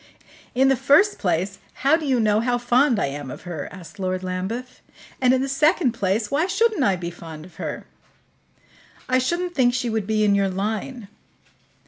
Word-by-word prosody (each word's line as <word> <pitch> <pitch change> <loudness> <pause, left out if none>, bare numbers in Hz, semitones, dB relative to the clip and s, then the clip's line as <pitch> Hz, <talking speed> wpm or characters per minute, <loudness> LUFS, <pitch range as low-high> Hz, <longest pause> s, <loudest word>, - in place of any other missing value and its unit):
"In 265 +2 +4
the 270 - +4
first 295 - +4
place, 185 +2 -1 0.3
how 285 +3 +6
do 320 -2 -3
you 260 -3 +2
know 215 -1 +3
how 245 +1 +1
fond 245 +1 +3
I - - +1
am 140 0 -5
of - - -9
her?" 170 -5 -6
asked 185 0 -12
Lord 185 -1 -2
Lambeth. 190 +8 -4 0.4
"And, 250 -1 +5
in 260 0 +2
the - - -2
second 300 0 +2
place, 210 0 -1
why 305 +6 +1
shouldn't 415 -3 +1
I 200 -5 +3
be 175 -1 -5
fond 165 -2 -10
of 180 - -17
her?" - - -5 1.2
"I 255 0 +3
shouldn't 345 +7 -1
think 245 -5 +2
she 245 -2 -1
would 220 -3 -2
be 215 -1 +1
in 205 -1 +4
your 200 -1 +2
line." 215 +4 -4
230 Hz, 190 wpm, -23 LUFS, 190-270 Hz, 1.2 s, how